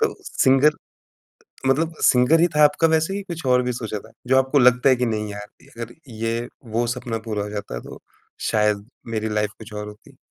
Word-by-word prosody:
तो - - +1
सिंगर 135 +3 +4 0.9
मतलब 160 +5 +1
सिंगर 125 +6 +5
ही 175 - +5
था 150 - +7
आपका 145 +3 +4
वैसे 160 +5 +1
ही 200 - -3
कुछ 170 -5 -7
और 125 0 +4
भी 125 - -1
सोचा 110 -3 -4
था। - - -15 0.2
जो 130 +1 +4
आपको 130 +2 +2
लगता 125 +1 +5
है 130 - +5
कि 125 0 0
नहीं 105 -2 -2
यार, 105 0 -7 0.3
अगर 115 0 -7 0.2
ये 115 +2 -2 0.3
वो 120 - +2
सपना 115 -2 -4
पूरा 105 -2 -1
हो 105 - -5
जाता 100 -13 -5
तो - - -10 0.5
शायद 105 -1 +1 0.3
मेरी 110 0 -1
लाइफ 105 -1 0
कुछ 110 0 -12
और 105 0 -5
होती। 105 0 -15
120 Hz, 205 wpm, -22 LUFS, 105-135 Hz, 0.9 s, था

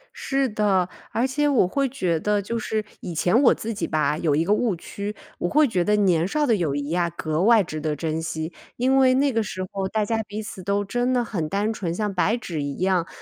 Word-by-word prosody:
是 270 -2 0
的， 195 -4 +1 0.2
而 235 +3 +1
且 290 +3 +1
我 245 -10 +3
会 275 +7 0
觉 180 -11 -1
得 210 +2 +1
就 230 +4 -3
是 215 -1 -2 0.2
以 170 - -6
前 180 - +3
我 - - +7
自 225 +1 -4
己 210 - -3
吧， 150 -1 +1
有 155 -4 +1
一 160 - +2
个 200 +4 +2
误 215 -4 +1
区。 200 +5 -6 0.2
我 175 - -1
会 305 -1 +4
觉 180 -6 0
得 210 +2 +2
年 180 -4 +3
少 300 +6 +1
的 230 -5 +3
友 160 -7 -1
谊 145 +1 -3
呀， 170 0 +1
格 155 -1 -2
外 220 0 +5
值 155 -3 -6
得 150 0 -1
珍 160 +1 -2
惜， 160 +1 -4 0.2
因 260 +2 +2
为 260 -1 +5
那 275 +1 +3
个 225 -1 +1
时 185 -3 -4
候 195 -1 -2
大 215 +2 0
家 225 +1 0
彼 210 +1 -6
此 190 -3 -8
都 200 +1 0
真 245 +5 0
的 245 -1 +2
很 170 -9 -3
单 205 +5 0
纯， 180 -6 -3
像 210 +1 -2
白 200 +5 +2
纸 165 -10 -4
一 140 -1 -4
样 185 -2 +1
200 Hz, 265 characters per minute, -24 LUFS, 170-230 Hz, 0.2 s, 我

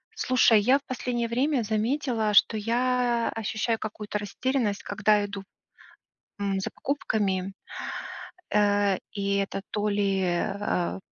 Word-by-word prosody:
Слушай, 235 -4 +4
я 255 +6 +5
в - - -30
последнее 245 -2 -2
время 255 +2 +1
заметила, 220 0 0
что 205 - +5
я 240 +1 +1
ощущаю 225 +1 -1
какую-то 210 -1 -4
растерянность, 215 +1 -1
когда 205 0 +2
иду, 200 -1 -6 1.0
м, 200 -1 0
за 190 - -3
покупками, 195 -8 -1 1.0
э, 205 -2 +3 0.2
и, 200 -1 0
это 195 0 -2
то 210 0 0
ли, 200 -2 +1
э, 175 -2 +1 0.2
а, 180 -2 -1
210 Hz, 125 wpm, -27 LUFS, 200-240 Hz, 1.0 s, я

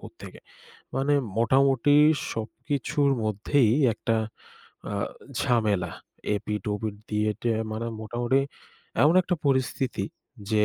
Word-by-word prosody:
কোত্থেকে?" - - -11 0.6
মানে 140 +2 +2 0.2
মোটামুটি 135 +3 +4 0.4
সবকিছুর 140 +6 -1
মধ্যেই 110 +3 +2 0.2
একটা 115 0 0 0.8
আ - - -2 0.4
ঝামেলা। 110 -7 +1 0.4
এপিঠ-ওপিঠ 105 +1 -3 0.2
দিয়ে-টিয়ে 105 +2 0
মানে 115 +2 -3
মোটামুটি 120 +4 +1 0.6
এমন 155 +4 +5
একটা 180 0 0
পরিস্থিতি 130 -5 0 0.5
যে, 105 -1 +4
115 Hz, 90 wpm, -26 LUFS, 105-135 Hz, 0.8 s, এমন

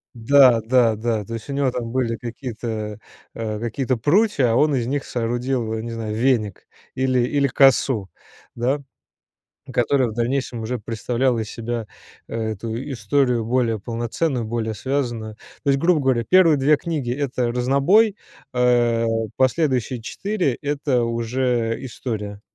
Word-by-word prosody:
Да, 125 0 +5
да, 115 -1 +3
да. 110 -1 -1
То 115 - -8
есть 115 +4 -8
у - - -2
него 140 -2 +1
там 115 -2 -4
были 120 -3 0
какие-то, 115 -3 -5 0.4
э, 110 -2 -3
какие-то 125 +3 -1
прутья, 145 - +3
а - - +2
он 150 +2 +3
из 120 -2 -1
них 140 +1 -2
соорудил, 120 0 -2
не 115 +1 -5
знаю, 110 -2 -4
веник 115 -5 0 0.3
или 130 -1 +1
или 140 +3 +2
косу, 130 -6 +3 0.5
да, 130 +5 0 0.9
которая 125 +1 +2
в 110 - -5
дальнейшем 120 0 -2
уже 120 +1 -3
представляла 120 +3 -1
из 110 - -4
себя 115 -1 -4 0.4
эту 110 0 -4 0.2
историю 125 0 +1
более 115 -3 +1
полноценную, 120 +3 -2
более 110 -1 -2
связанную. 120 -3 -3 0.3
То 140 - 0
есть, 135 - +2
грубо 170 -1 +3
говоря, 130 -3 +1
первые 170 -1 +5
2 145 +2 +4
книги- 150 -8 -3
это 125 -3 -1
разнобой, 140 - +3 0.4
а 120 -2 +3 0.3
последующие 130 -3 +1
4- 195 - -1
это 145 -4 0
уже 115 0 -1
история. 105 -5 -5
120 Hz, 140 wpm, -22 LUFS, 115-135 Hz, 0.9 s, Да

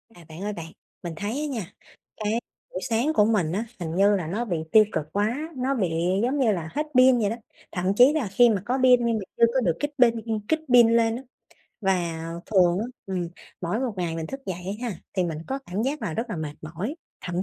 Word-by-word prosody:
À, 170 -2 -15
bạn 160 +3 -9
ơi 210 0 -2
bạn, 165 -3 -8 0.3
mình 170 - -4
thấy 205 +6 -3
á - - -1
nha, 225 - -4 0.5
cái 210 +1 0 0.4
buổi 185 - -4
sáng 240 +7 +1
của 210 - +5
mình 205 -8 +1
á, 210 +6 -1
hình 165 -2 -4
như 200 +2 +5
là 175 -5 -2
nó 210 +8 -2
bị 180 -7 -1
tiêu 220 - +8
cực 150 - -2
quá, 210 +5 +1 0.2
nó 260 +2 0
bị 190 -8 0 0.3
giống 265 +4 +1
như 245 -5 +4
là 170 -5 -3
hết 300 - -1
pin 255 -1 +7
vậy 205 -3 +1
đó, 225 - -2 0.4
thậm 180 0 -3
chí 250 +6 +7
là 305 -8 0
khi 240 +5 +5
mà 205 -4 +1
có 250 +4 0
pin 250 -2 +6
nhưng 230 -1 +1
mà - - -3 0.2
chưa 235 - +7
có 265 - +3
được 175 -8 +2
kích 290 0 -1
pin 235 -2 +5
ừm, 220 -2 -1
kích 315 - +2
pin 240 -2 +8
lên 230 -1 +3
á. 245 - -5 0.6
Và 175 -5 0 0.2
thường 180 -4 +4
á, 215 - -1 0.2
ừm, 180 -3 -2 0.3
mỗi 185 +6 -1
một 255 -3 -1
ngày 170 -3 -2
mình 160 -1 -4
thức 270 +8 -7
dậy 185 +2 -4
á 245 - -1
ha, 200 - -5 0.2
thì 185 - +2
mình 165 -3 -3
có 270 +1 -2
cảm 190 +4 -2
giác 275 +3 -2
là 175 -7 -2
rất 230 +5 -3
là 205 - -3
mệt 155 -2 -4
mỏi, 170 - -4 0.3
thậm 175 +1 -2
210 Hz, 250 wpm, -25 LUFS, 175-240 Hz, 0.6 s, tiêu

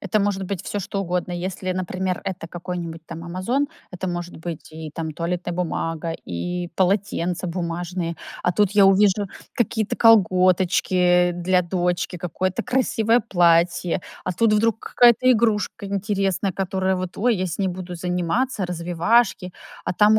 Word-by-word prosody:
это 200 +1 0
может 200 -1 0
быть 185 -1 -4
всё 205 - -3
что 195 +1 -3
угодно. 180 -1 -2
Если, 185 +1 -3
например, 185 0 -2
это 185 -3 -4
какой-нибудь 175 -1 -5
там 165 0 -8
"Амазон" 190 +12 -1 0.2
это 185 +1 -4
может 175 0 -5
быть 165 -2 -7
и 160 0 -8
там 160 -2 -4
туалетная 175 +2 -3
бумага, 165 -2 -2 0.2
и 175 - -3
полотенца 185 -2 0
бумажные, 170 0 -3 0.3
а 180 - +2
тут 205 +1 +2
я 205 -1 +6
увижу 200 +1 +4 0.3
какие-то 220 -2 0
колготочки 180 -3 +4
для 180 +1 +1
дочки, 175 0 -1
какое-то 180 +2 -2
красивое 240 -2 +2
платье, 175 -4 +2 0.2
а 185 - -1
тут 225 +4 +2
вдруг 220 +1 +2
какая-то 245 +1 +4
игрушка 220 -3 0
интересная, 195 -1 -1
которая 190 +1 -1
вот: 185 0 -5
"Ой, 240 +3 +2
я 185 0 -1
с 170 - -5
ней 195 -2 +1
буду 180 0 -6
заниматься, 180 +6 -1
развивашки". 180 +3 +1 0.3
А - - -2
там 210 +3 +5
185 Hz, 150 wpm, -23 LUFS, 175-200 Hz, 0.3 s, я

